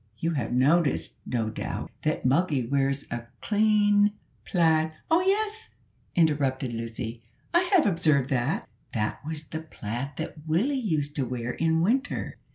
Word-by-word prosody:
You 165 +5 -1
have 130 -9 -2
noticed, 140 +5 +2
no 115 -3 -1
doubt, - - -5
that 155 -3 -1
Moggy 140 -1 +2
wears 135 +2 0
a 120 0 -4
clean 205 -1 +3 0.3
plaid 160 -3 +2
" - - -25
"Oh, 330 +2 +5
yes," 425 +3 0 0.5
interrupted 140 -6 +2
Lucy; 115 0 -5 0.3
"I 350 +1 +3
have 370 -5 +5
observed 155 -7 +2
that." 130 +3 0 0.3
"That 105 +2 -2
was 155 0 -4
the 160 +1 -6
plaid 135 -2 -5
that 155 0 -6
Willie 190 - +2
used 155 - -1
to 140 - +1
wear 125 -1 -3
in 160 +3 +1
winter. 260 +10 0
155 Hz, 150 wpm, -27 LUFS, 130-200 Hz, 0.5 s, Oh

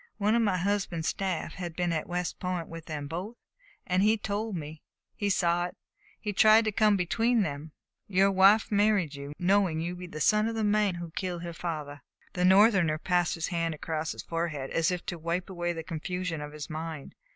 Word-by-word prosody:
One 210 +1 +2
of 235 - +3
my 200 -5 +2
husband's 190 -3 -1
staff 190 -4 -2
had 175 -3 -6
been 175 -1 0
at 155 - -3
West 175 -1 -3
Point 180 -2 -3
with 165 -1 -9
them 150 -3 -4
both, 180 +9 -5 0.5
and 180 +1 +1
he 215 +2 +4
told 210 0 -3
me. 155 -1 -7 0.3
He 205 -2 -1
saw 175 -2 +2
it, - - -13 0.5
and 205 -2 -2
tried 220 +2 +6
to 215 - +1
come 210 -1 +3
between 225 +6 +2
them. 150 -1 -5 0.4
Your 195 0 +3
wife 195 +4 +5
married 205 -6 +2
you, 140 0 -7
knowing 185 -2 +2
you 170 +2 -2
to 180 - -9
be 180 - -7
the 155 -3 -8
son 210 +7 +3
of 230 - -3
the 220 - -1
man 210 -2 +2
who 170 -1 -7
killed 175 0 -4
her 170 -1 -5
father." 150 -4 -5 0.3
The 180 - -1
Northerner 190 -4 +5
passed 175 +1 +1
his 165 -1 -3
hand 165 -3 -1
across 160 +1 -3
his - - -8
forehead 165 -5 -3
as 165 +2 +2
if 180 -1 -3
to 175 - -4
wipe 170 +3 -2
away 175 -1 -2
the 165 -1 -5
confusion 170 0 -4
of 150 0 -6
his 150 -1 -6
mind. 155 -2 -6
175 Hz, 210 wpm, -29 LUFS, 165-200 Hz, 0.5 s, tried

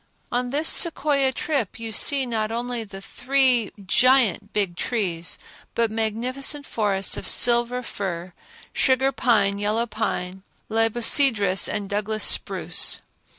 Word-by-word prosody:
On 245 0 -2
this 295 +5 -1
Sequoia 280 -5 +2
trip 265 - -3
you 225 -1 -5
see 270 +5 +3
not 220 -3 -2
only 240 0 -4
the 195 -2 -11 0.8
giant 245 -2 +3
Big 195 -4 -1
Trees 180 -6 -3 0.4
but 230 -2 0
magnificent 250 +6 -2
forests 200 -5 -1
of - - -4
silver 240 +1 +3
fir, 180 -5 -6 0.4
sugar 265 +1 +1
pine, 205 -6 +1
yellow 215 +3 0
pine, 190 -4 -4 0.3
libocedrus 225 -2 +3
and 205 -2 -3
Douglas 210 +2 -2
spruce. - - +1
225 Hz, 115 wpm, -23 LUFS, 205-250 Hz, 0.8 s, see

